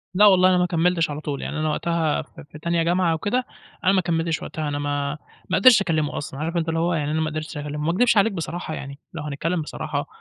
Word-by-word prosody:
لأ 205 +3 +6
والله 185 -2 +6
أنا 185 - +4
ما 180 - +3
كمّلتش 170 -1 +1
على 145 +1 -5
طول 145 -3 -4
يعني 155 - -4
أنا 155 0 0
وقتها 165 0 0
في - - -13
في 155 - -10
تانية 170 +1 0
جامعة 175 0 +2
وكده 205 +10 -1 0.4
أنا 185 - +5
ما 190 - +3
كمّلتش 165 -2 -1
وقتها، 155 -1 -4
أنا 145 0 -2
ما 145 0 -2 0.3
ما 185 - +2
قدَرتش 210 +1 +7
أكلمه 155 -5 0
أصلًا، 140 -1 -6
عارف 165 +3 -2
أنت 165 -1 0
اللي 165 0 0
هو 170 +1 +1
يعني 150 -2 -1
أنا 160 - 0
ما 155 - 0
قدَرتش 155 0 -5
أكلمه، 145 0 -5
ما 165 - +1
اكدبش 230 +5 +3
عليك 205 +2 +4
بصراحة، 165 -2 -4
يعني 140 -1 -7
لو 160 -3 -5
هنتكلم 155 +4 -2
بصراحة 150 -1 -4
165 Hz, 245 wpm, -23 LUFS, 150-180 Hz, 0.4 s, قدَرتش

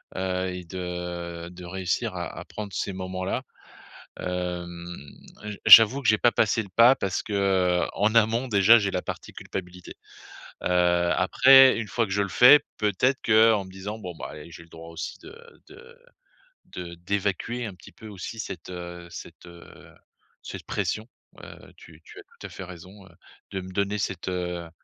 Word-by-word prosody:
Heu, 95 0 -2
et 90 0 -7
de 85 -1 -6
de 90 0 -11
réussir 95 +4 -3
à 90 -1 -4
à - - -9
prendre 105 -2 -8
ces 100 - -3
moments-là. 95 0 -4 0.8
Hem, 90 -1 -5 0.6
j 105 -1 -6
j'avoue 115 +5 +9
que 125 - -1
j'ai 110 - +5
pas 120 - +3
passé 115 +1 +1
le 100 - -14
pas, 120 +7 +6
parce 95 -1 -2
que, 105 - -8
heu, 95 -3 +1
en 105 +2 0
amont 115 +3 +2
déjà, 105 +1 +6
j'ai 100 -3 -1
la 90 - -3
partie - - -7
culpabilité. 90 -1 -8 0.7
Heu, - - 0 0.5
après 135 +7 +6
1 110 - -4
fois 115 +4 0
que 95 - -10
je 100 +1 +1
le 100 - -1
fais, 125 +9 +8 0.2
peut-être 110 +6 +1
qu'en 110 -2 +4
me 95 - -13
disant: 100 +3 -7
«Bon, 90 -4 -7
ben, - - -7
eh, 75 +3 -11
j'ai 85 - -11
le 85 - -22
droit 80 0 -12
aussi 85 -1 -7
de - - -12 0.4
de 470 0 -15 0.7
de 90 -1 -8
d'évacuer 100 +6 -3
un 105 - -6
petit 90 - -16
peu 110 - -13
aussi 105 +2 -8
cette, 95 -5 -7
heu, 85 -1 -8
cette, 85 - -11
heu, 85 0 -15 0.5
cette - - -8
pression», 110 +1 -3 0.4
heu, - - -13
tu 80 -1 -16
tu - - -13
as - - -12
tout - - -15
à - - -14
fait - - -9
raison, 95 +2 -12
heu, - - -18 0.4
de 95 -1 -4
me 95 0 -10
donner 100 +1 -1
cette, 95 -3 -4
heu 90 -2 -4
95 Hz, 185 wpm, -25 LUFS, 90-110 Hz, 0.8 s, j'avoue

